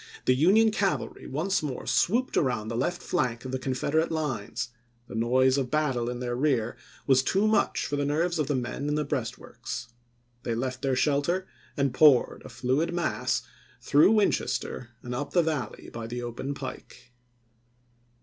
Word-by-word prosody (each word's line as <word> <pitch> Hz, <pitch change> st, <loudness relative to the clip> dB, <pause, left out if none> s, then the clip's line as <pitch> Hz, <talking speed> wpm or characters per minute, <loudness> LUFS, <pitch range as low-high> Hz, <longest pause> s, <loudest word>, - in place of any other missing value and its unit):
The 130 Hz, -, +5 dB
Union 200 Hz, -, +5 dB
cavalry 200 Hz, -3 st, -1 dB
once 165 Hz, +8 st, 0 dB
more 135 Hz, -7 st, -4 dB
swooped 205 Hz, -, +1 dB
around 120 Hz, -6 st, +1 dB
the 115 Hz, -, -3 dB
left 155 Hz, +9 st, -1 dB
flank 125 Hz, -7 st, -1 dB
of 130 Hz, -, -4 dB
the 130 Hz, -, -2 dB
Confederate 140 Hz, +6 st, 0 dB
lines; 125 Hz, -6 st, -2 dB, 0.4 s
the -, -, -10 dB
noise 130 Hz, +4 st, +3 dB
of 130 Hz, -2 st, -2 dB
battle 135 Hz, -6 st, 0 dB
in 125 Hz, 0 st, -4 dB
their 120 Hz, -1 st, -2 dB
rear 125 Hz, -4 st, +1 dB, 0.3 s
was 130 Hz, -2 st, +5 dB
too 195 Hz, +10 st, +2 dB
much 215 Hz, -, +2 dB
for 145 Hz, -, -2 dB
the 145 Hz, -, 0 dB
nerves 165 Hz, +4 st, 0 dB
of 150 Hz, -, +1 dB
the 145 Hz, -, 0 dB
men 130 Hz, +3 st, -3 dB
in 150 Hz, -, +1 dB
the 150 Hz, 0 st, 0 dB
breastworks. 120 Hz, -4 st, -5 dB, 0.5 s
They 115 Hz, -, -2 dB
left 130 Hz, +2 st, -3 dB
their 135 Hz, -2 st, +1 dB
shelter, 150 Hz, +7 st, +1 dB, 0.3 s
and 140 Hz, -3 st, +1 dB
poured, 140 Hz, -2 st, +5 dB
a -, -, -10 dB
fluid 150 Hz, +7 st, 0 dB
mass, 65 Hz, -, 0 dB, 0.4 s
through 150 Hz, +9 st, +5 dB
Winchester 200 Hz, -, 0 dB
and 125 Hz, -, -5 dB
up 145 Hz, +4 st, -4 dB
the 175 Hz, -, +4 dB
Valley 150 Hz, -9 st, -3 dB
by 115 Hz, -1 st, -5 dB
the 120 Hz, +1 st, -5 dB
open 120 Hz, +4 st, -4 dB
pike. 130 Hz, -2 st, -9 dB
135 Hz, 170 wpm, -27 LUFS, 120-155 Hz, 0.5 s, The